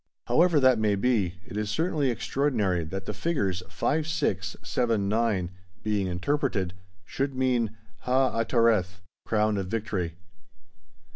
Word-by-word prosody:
However 170 Hz, -2 st, +4 dB
that 130 Hz, -4 st, +5 dB
may 105 Hz, -2 st, +2 dB
be, 100 Hz, -5 st, +1 dB
it -, -, -10 dB
is 105 Hz, -1 st, -2 dB
certainly 155 Hz, -, +1 dB
extraordinary 115 Hz, -, 0 dB
that 95 Hz, +4 st, -5 dB
the -, -, -3 dB
figures 100 Hz, -, -1 dB
5, 150 Hz, -, 0 dB
6, 100 Hz, -, -1 dB
7, 115 Hz, -5 st, 0 dB
9, 105 Hz, -4 st, +1 dB, 0.3 s
being 105 Hz, -3 st, 0 dB
interpreted, 95 Hz, 0 st, -1 dB, 0.3 s
should 135 Hz, +5 st, -2 dB
mean 120 Hz, -4 st, +1 dB, 0.2 s
Ha 130 Hz, +1 st, +1 dB
atereth 115 Hz, -5 st, +2 dB, 0.3 s
"Crown 105 Hz, -1 st, +2 dB
of 95 Hz, -2 st, -2 dB
Victory." 95 Hz, -5 st, -2 dB
110 Hz, 130 wpm, -27 LUFS, 95-130 Hz, 0.3 s, that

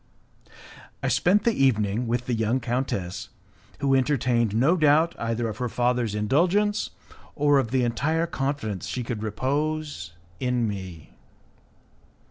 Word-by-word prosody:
I -, -, +1 dB
spent 195 Hz, +3 st, +3 dB
the 235 Hz, -, +3 dB
evening 115 Hz, -, +1 dB
with 120 Hz, +1 st, -1 dB
the 125 Hz, -, -1 dB
young 115 Hz, +3 st, +1 dB
countess, 115 Hz, -8 st, -3 dB, 0.5 s
who 140 Hz, -1 st, +2 dB
entertained 125 Hz, -5 st, +2 dB
no 135 Hz, +10 st, +4 dB
doubt 160 Hz, +1 st, +4 dB
either 115 Hz, 0 st, -1 dB
of 110 Hz, -1 st, -5 dB
her 125 Hz, -1 st, -1 dB
father's 120 Hz, -2 st, 0 dB
indulgence 180 Hz, -, +1 dB, 0.5 s
or 145 Hz, -1 st, +4 dB
of 125 Hz, -4 st, -1 dB
the 130 Hz, +1 st, +1 dB
entire 145 Hz, +8 st, 0 dB
confidence 135 Hz, -, -3 dB
she 125 Hz, -, -3 dB
could 115 Hz, -2 st, -4 dB
repose 140 Hz, -, -2 dB, 0.3 s
in 125 Hz, -2 st, 0 dB
me. 95 Hz, -6 st, -7 dB
125 Hz, 130 wpm, -25 LUFS, 110-145 Hz, 0.5 s, no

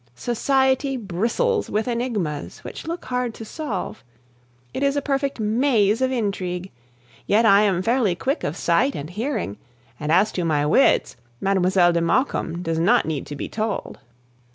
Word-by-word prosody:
Society 265 Hz, -, +1 dB
bristles 235 Hz, -, -1 dB
with 215 Hz, +3 st, -1 dB
enigmas 225 Hz, -, -3 dB
which -, -, -8 dB
look 335 Hz, +1 st, -4 dB
hard 250 Hz, -2 st, -2 dB
to 225 Hz, -, -8 dB
solve. 240 Hz, -, -5 dB, 0.7 s
It -, -, -4 dB
is 280 Hz, 0 st, +2 dB
a -, -, +2 dB
perfect 275 Hz, -1 st, -1 dB
maze 220 Hz, 0 st, +2 dB
of 260 Hz, 0 st, +2 dB
intrigue. 190 Hz, -6 st, -2 dB, 0.6 s
Yet 220 Hz, +3 st, +4 dB
I 200 Hz, -1 st, +6 dB
am 190 Hz, -4 st, +1 dB
fairly 230 Hz, -5 st, +2 dB
quick 270 Hz, -, -2 dB
of -, -, -3 dB
sight 275 Hz, +1 st, +2 dB
and 150 Hz, +4 st, -6 dB
hearing, 215 Hz, -, -3 dB, 0.4 s
and 150 Hz, 0 st, -2 dB
as 190 Hz, +6 st, +4 dB
to 180 Hz, -, -2 dB
my 150 Hz, -3 st, +1 dB
wits, 165 Hz, -, +3 dB, 0.2 s
Mlle. 185 Hz, -2 st, +3 dB
de 170 Hz, 0 st, +1 dB
Maucombe 170 Hz, -3 st, 0 dB
does 165 Hz, -1 st, -1 dB
not 225 Hz, +9 st, +3 dB
need 155 Hz, -4 st, -3 dB
to 145 Hz, -, -6 dB
be -, -, -5 dB
told! 215 Hz, -1 st, -3 dB
215 Hz, 160 wpm, -23 LUFS, 180-260 Hz, 0.7 s, I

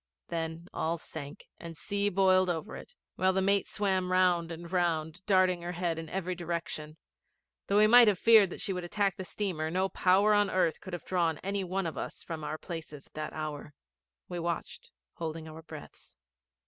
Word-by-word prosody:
Then 165 Hz, 0 st, -3 dB
all 165 Hz, +1 st, -1 dB
sank, 145 Hz, -3 st, -9 dB
and 165 Hz, -1 st, -8 dB
sea 205 Hz, +2 st, 0 dB
boiled 185 Hz, -1 st, +4 dB
over 175 Hz, +4 st, -3 dB
it, -, -, -11 dB, 0.2 s
while 185 Hz, 0 st, +3 dB
the 190 Hz, -, +2 dB
mate 200 Hz, 0 st, +2 dB
swam 190 Hz, -3 st, 0 dB
round 180 Hz, -2 st, +3 dB
and 170 Hz, +1 st, -8 dB
round, 170 Hz, -1 st, 0 dB
darting 185 Hz, -3 st, +3 dB
her 175 Hz, +1 st, -4 dB
head 170 Hz, -2 st, -1 dB
in 160 Hz, -1 st, -7 dB
every 185 Hz, -1 st, -2 dB
direction. 170 Hz, -3 st, -5 dB, 0.7 s
Though 200 Hz, -, +2 dB
we 210 Hz, -, +7 dB
might 240 Hz, +2 st, +8 dB
have 205 Hz, -3 st, +4 dB
feared 220 Hz, -2 st, +6 dB
that -, -, -6 dB
she 195 Hz, -, 0 dB
would 180 Hz, -1 st, -4 dB
attack 195 Hz, +2 st, 0 dB
the 190 Hz, -, -6 dB
steamer, 180 Hz, -5 st, -2 dB
no 185 Hz, +3 st, 0 dB
power 195 Hz, +4 st, +4 dB
on 205 Hz, -1 st, +3 dB
earth 185 Hz, -4 st, +1 dB
could 185 Hz, -, -9 dB
have 175 Hz, -, -5 dB
drawn 170 Hz, -4 st, +1 dB
any 195 Hz, +1 st, -1 dB
one 190 Hz, +1 st, -2 dB
of 160 Hz, -4 st, -4 dB
us -, -, -6 dB
from 160 Hz, -2 st, -6 dB
our 150 Hz, +1 st, -3 dB
places 155 Hz, -4 st, -8 dB
that 155 Hz, 0 st, -5 dB
hour. 150 Hz, -2 st, -6 dB, 0.5 s
We 175 Hz, -, -4 dB
watched, 170 Hz, -, -4 dB, 0.3 s
holding 160 Hz, -1 st, -5 dB
our 160 Hz, +1 st, -9 dB
breaths. 155 Hz, -, -12 dB
175 Hz, 190 wpm, -30 LUFS, 160-190 Hz, 0.7 s, might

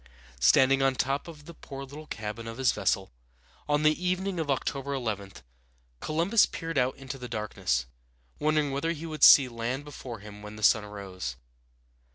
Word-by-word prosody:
Standing 130 Hz, -, +5 dB
on 135 Hz, -1 st, +3 dB
top 135 Hz, +4 st, -1 dB
of 150 Hz, -3 st, -11 dB
the 170 Hz, -, -10 dB
poor 135 Hz, -3 st, -9 dB
little 145 Hz, +3 st, -10 dB
cabin 110 Hz, +2 st, -6 dB
of 115 Hz, 0 st, -7 dB
his 130 Hz, -2 st, +3 dB
vessel, 95 Hz, -3 st, -1 dB, 0.6 s
on 145 Hz, +1 st, +2 dB
the 155 Hz, +3 st, +2 dB
evening 185 Hz, 0 st, -1 dB
of 155 Hz, -3 st, -2 dB
October 140 Hz, +1 st, -1 dB
11, 105 Hz, -6 st, -4 dB, 0.7 s
Columbus 170 Hz, +8 st, +3 dB
peered 165 Hz, -3 st, -3 dB
out 125 Hz, +1 st, 0 dB
into 135 Hz, 0 st, -7 dB
the 125 Hz, -, -6 dB
darkness, 105 Hz, -, -1 dB, 0.5 s
wondering 150 Hz, -1 st, +1 dB
whether 140 Hz, +5 st, -1 dB
he 165 Hz, 0 st, -7 dB
would 155 Hz, -2 st, -4 dB
see 135 Hz, -3 st, +9 dB
land 120 Hz, +4 st, -4 dB
before 130 Hz, -5 st, -8 dB
him 105 Hz, 0 st, -11 dB
when 105 Hz, 0 st, -9 dB
the 110 Hz, -, -9 dB
sun 105 Hz, 0 st, +5 dB
rose. 95 Hz, -10 st, -6 dB
135 Hz, 175 wpm, -28 LUFS, 105-150 Hz, 0.7 s, see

